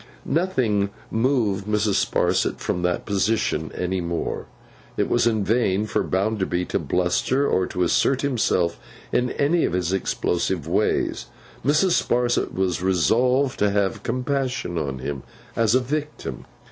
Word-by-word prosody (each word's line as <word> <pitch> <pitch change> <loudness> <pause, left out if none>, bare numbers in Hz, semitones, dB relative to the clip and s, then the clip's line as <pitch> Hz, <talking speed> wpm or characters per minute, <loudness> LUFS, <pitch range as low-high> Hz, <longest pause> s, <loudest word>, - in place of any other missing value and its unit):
Nothing 130 - +1 0.2
moved 110 -5 +1
Mrs. 105 -1 +2
Sparsit - - +1
from 90 - -2
that 90 0 -1
position 105 -5 0
any 90 +1 -1
more. 85 -1 -3 0.5
It - - +1
was - - +2
in 110 -3 +1
vain 105 -2 +1
for 110 - 0
Bounderby 95 -2 0
to - - 0
bluster 90 +10 +1
or 90 -1 +1
to 90 - -1
assert 130 +9 +2
himself 110 -10 +1 0.3
in 125 0 +1
any 160 +4 +2
of - - 0
his 90 0 0
explosive 90 -3 -1
ways; - - 0 0.4
Mrs. 155 +6 +3
Sparsit 120 0 +1
was 95 -3 -1
resolved 125 +9 +2
to 105 - +3
have 100 -1 0
compassion 130 -5 -2
on 70 -4 -3
him, 65 +1 -4 0.3
as 115 0 +3
a - - +5
Victim. 150 +4 -4
105 Hz, 140 wpm, -23 LUFS, 90-125 Hz, 0.5 s, a